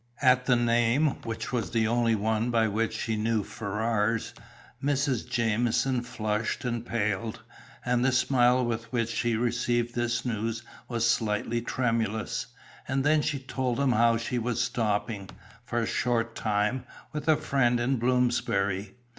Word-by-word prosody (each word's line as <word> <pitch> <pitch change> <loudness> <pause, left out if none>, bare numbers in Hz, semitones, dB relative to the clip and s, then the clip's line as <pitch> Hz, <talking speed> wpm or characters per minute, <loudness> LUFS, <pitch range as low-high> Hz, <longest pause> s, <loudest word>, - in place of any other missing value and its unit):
At 125 -1 +4
the 125 - +5
name, 120 +5 +2
which 115 +2 -5
was 115 -7 -1
the 110 -1 +1
only 115 0 +2
one 110 +2 0
by 115 -2 +3
which 110 +1 -1
she 110 0 -1
knew 110 0 0
Ferrars, 110 +1 -1 0.5
Mrs. 140 -4 0
Jamieson 120 +2 +1
flushed 115 +1 -2
and 120 -2 -2
paled, 110 -2 -2 0.4
and 125 0 +2
the 130 - +3
smile 125 -1 +3
with 115 -1 -3
which 115 -2 0
she 120 -1 0
received 120 0 0
this 120 0 -1
news 115 0 -2 0.2
was 115 -1 0
slightly 115 +1 0
tremulous. 115 -4 -1 0.4
And 135 +1 0
then 150 +1 +4
she 145 -1 -1
told 130 -2 -2
them 140 -2 +2
how 115 0 +4
she 120 +2 -2
was 120 +1 -1
stopping, 110 -4 -1 0.3
for 120 - -4
a - - 0
short 115 -2 0
time, 105 +4 0 0.3
with 150 0 -5
a 155 - +6
friend 125 -3 +1
in 130 +3 +1
Bloomsbury. 115 -5 0
120 Hz, 150 wpm, -28 LUFS, 110-125 Hz, 0.5 s, a